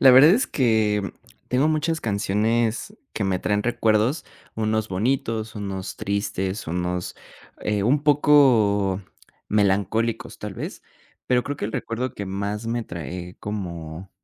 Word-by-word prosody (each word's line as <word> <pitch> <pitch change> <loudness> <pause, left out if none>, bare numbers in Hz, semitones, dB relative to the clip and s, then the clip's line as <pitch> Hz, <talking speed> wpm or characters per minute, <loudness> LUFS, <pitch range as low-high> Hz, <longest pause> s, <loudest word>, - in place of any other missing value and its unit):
La 135 - +9
verdad 135 +6 +9
es 240 +8 +3
que, 110 -5 +2
mm, - - -2 0.4
tengo 130 +4 +3
muchas 155 +1 0
canciones 110 +2 0 0.2
que - - -3
me 95 -1 +1
traen 105 +2 0
recuerdos, 115 +4 +1 0.3
unos 110 0 0
bonitos, 110 +2 -1
unos 100 -3 -5
tristes, 100 0 -2
unos, 90 +1 -2 0.5
eh, 105 -1 0
un 140 +6 +3
poco 120 -10 +4 0.5
melancólicos, 105 +3 +1
tal - - -6
vez, - - -6 0.4
pero 125 -1 +3
creo 145 0 -3
que - - -4
el 110 - -3
recuerdo 120 +2 -3
que 100 - -5
más 100 +3 -3
me 120 +1 -1
trae 90 0 -7
como 90 -3 -6
105 Hz, 140 wpm, -24 LUFS, 95-120 Hz, 0.5 s, La